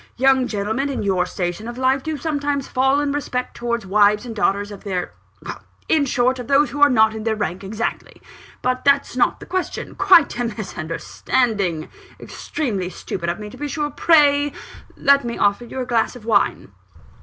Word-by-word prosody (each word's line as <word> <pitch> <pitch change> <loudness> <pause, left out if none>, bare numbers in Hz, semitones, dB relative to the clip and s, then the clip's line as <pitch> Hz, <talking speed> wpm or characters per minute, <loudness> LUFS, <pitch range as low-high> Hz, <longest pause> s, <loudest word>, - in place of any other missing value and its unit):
Young 265 0 +3
gentlemen 220 +5 -2
in 270 - -3
your 185 -3 +1
station 180 +5 -4
of 240 +1 -7
life 260 +1 +2
do 315 +1 -4
sometimes 285 -3 -2
fail 265 +2 +2
in 290 -1 0
respect 255 -3 -3
towards 235 -1 -2
the 190 - -12
wives 210 +2 +4
and 230 -2 -7
daughters 205 0 0
of 200 - -10
their 185 -4 -3 0.7
in 305 -3 +3
short, 250 0 +1
of 245 - -6
those 285 +1 +3
who 290 - -5
are 290 - +8
not 220 -3 +4
in 220 -1 -6
their 220 -1 0
rank 185 -3 -3
exactly. 215 +4 -4 0.4
But 255 0 0
that's 280 -2 +2
not 255 - +2
the - - -10
question 370 0 -3
quite 360 -10 +4
a 245 - 0
misunderstanding 195 -1 -2 0.3
extremely 205 - -4
stupid 170 -1 -5
of 170 - -2
me, 210 -1 -8
to - - -12
be 295 - -4
sure. 295 0 -2
Pray 290 -2 +4 0.4
let 280 0 +4
me 235 -1 -4
offer 205 +4 +1
you 260 - -7
a - - -3
glass 235 0 0
of 235 -3 -12
wine!" 205 - +1
245 Hz, 190 wpm, -21 LUFS, 205-280 Hz, 0.7 s, are